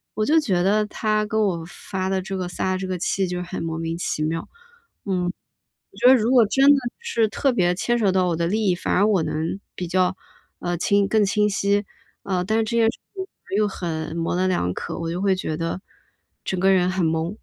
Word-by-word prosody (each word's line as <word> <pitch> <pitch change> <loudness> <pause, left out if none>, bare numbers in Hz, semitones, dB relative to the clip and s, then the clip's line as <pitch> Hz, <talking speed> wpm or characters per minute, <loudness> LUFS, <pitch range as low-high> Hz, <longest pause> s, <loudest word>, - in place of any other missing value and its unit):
我 215 - 0
就 320 +5 +4
觉 185 - +1
得 210 +3 +3
他 215 0 0
跟 220 +1 -1
我 185 -6 0
发 185 +1 -4
的 190 -1 0
这 190 +1 -5
个 185 -1 -3
撒 185 +1 -2
的 185 - 0
这 190 - -4
个 185 -1 -2
气 190 +2 0
就 180 0 -3
很 180 +2 -5
莫 165 -1 -3
名 165 0 -3
其 155 - -2
妙。 165 +1 -2 0.6
嗯， 185 -2 0
我 180 - -12
觉 - - +2
得 260 - +9
如 230 0 +1
果 250 -3 +6
真 270 +6 +3
的 285 - +8 0.2
是 235 - 0
特 265 +6 +1
别 180 -7 +2
牵 240 +6 0
扯 205 -4 +3
到 185 -1 +2
我 170 - 0
的 170 0 0
利 215 +2 0
益， 180 - +3
反 175 - -3
而 200 - +4
我 200 -6 +2
能 160 +5 -2 0.2
比 180 - -4
较， 185 +1 +1 0.4
呃， 175 0 -2
清 200 +3 +2
更 215 -2 +3
清 210 +1 +2
晰。 200 0 +1 0.4
呃， 180 -2 -1
但 220 +3 +1
是 225 - +2
这 235 +2 -2
件 230 - +4
事 - - -15 0.2
情 380 -1 -4 0.3
又 215 - +3
很 160 -5 -4
模 165 +1 -1
棱 185 +1 +1
两 90 - 0
可， - - -5
我 165 0 -3
就 180 +3 -3
会 195 -1 +3
觉 160 -4 -3
得， 165 +3 -3 0.6
整 185 - -2
个 195 +1 +4
人 180 -1 +3
很 185 -2 0
懵。 165 +5 -1
190 Hz, 255 characters per minute, -23 LUFS, 175-210 Hz, 0.6 s, 得